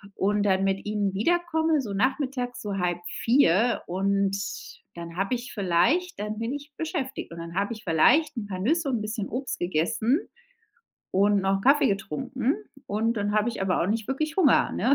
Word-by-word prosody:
und 205 Hz, +1 st, +1 dB
dann 190 Hz, -1 st, +2 dB
mit 195 Hz, 0 st, 0 dB
ihnen 205 Hz, -2 st, -1 dB
wiederkomme. 320 Hz, -, +1 dB
So, 210 Hz, -6 st, -5 dB
Nachmittags, 255 Hz, +1 st, -1 dB
so, 205 Hz, -3 st, -3 dB
15:30, 185 Hz, +5 st, +2 dB
und 195 Hz, +2 st, +1 dB, 0.6 s
dann 170 Hz, 0 st, -8 dB
habe 195 Hz, +6 st, 0 dB
ich 245 Hz, +1 st, -7 dB
vielleicht 200 Hz, -, +1 dB
dann 210 Hz, +1 st, -3 dB
bin 230 Hz, +3 st, -2 dB
ich 290 Hz, +1 st, -7 dB
beschäftigt, 310 Hz, -, -4 dB
und 170 Hz, -, -8 dB
dann 170 Hz, 0 st, -7 dB
hab 200 Hz, +3 st, 0 dB
ich 220 Hz, -1 st, -7 dB
vielleicht 260 Hz, -, +3 dB
'n 220 Hz, -, -3 dB
paar 185 Hz, -2 st, -5 dB
Nüsse 300 Hz, -, +1 dB
und 250 Hz, -, +1 dB
'n -, -, -6 dB
bisschen 215 Hz, -1 st, -4 dB
Obst 255 Hz, +1 st, -3 dB
gegessen 220 Hz, -, +1 dB, 0.9 s
und 200 Hz, +1 st, +3 dB
noch 195 Hz, 0 st, +1 dB
n' -, -, -7 dB
Kaffee 280 Hz, +7 st, +5 dB
getrunken, 250 Hz, +6 st, -1 dB, 0.3 s
und 225 Hz, 0 st, 0 dB
dann 205 Hz, 0 st, -1 dB
habe 215 Hz, +2 st, +2 dB
ich 230 Hz, -, -5 dB
aber 190 Hz, -1 st, +1 dB
auch -, -, 0 dB
nicht 220 Hz, +2 st, -1 dB
wirklich 310 Hz, +4 st, -2 dB
Hunger, 325 Hz, -9 st, +4 dB
ne? 260 Hz, +4 st, +2 dB
215 Hz, 185 wpm, -26 LUFS, 195-265 Hz, 0.9 s, Kaffee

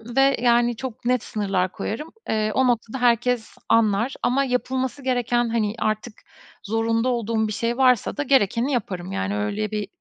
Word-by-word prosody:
ve 270 Hz, 0 st, +4 dB
yani 240 Hz, 0 st, +3 dB
çok 235 Hz, 0 st, -7 dB
net 250 Hz, -1 st, +1 dB
sınırlar 195 Hz, -3 st, -1 dB
koyarım. 300 Hz, +9 st, -5 dB, 0.2 s
Eee, 215 Hz, -1 st, +1 dB
o 260 Hz, -1 st, +3 dB
noktada 240 Hz, +1 st, -1 dB
herkes 240 Hz, -1 st, +1 dB
anlar 225 Hz, +2 st, +3 dB
ama 270 Hz, +3 st, +2 dB
yapılması 260 Hz, +1 st, -2 dB
gereken, 245 Hz, -2 st, +1 dB
hani, 220 Hz, -2 st, 0 dB
artık 215 Hz, +1 st, -2 dB, 0.5 s
zorunda 225 Hz, +3 st, 0 dB
olduğum 225 Hz, -2 st, 0 dB
bir 215 Hz, -, -4 dB
şey 235 Hz, +3 st, -1 dB
varsa 255 Hz, -2 st, +3 dB
da, 290 Hz, -, 0 dB
gerekeni 255 Hz, -1 st, +2 dB
yaparım. 190 Hz, -7 st, -3 dB
Yani, 95 Hz, -, -2 dB
öyle, 200 Hz, -, -2 dB
bir 210 Hz, -1 st, -2 dB
235 Hz, 160 wpm, -23 LUFS, 215-250 Hz, 0.5 s, ve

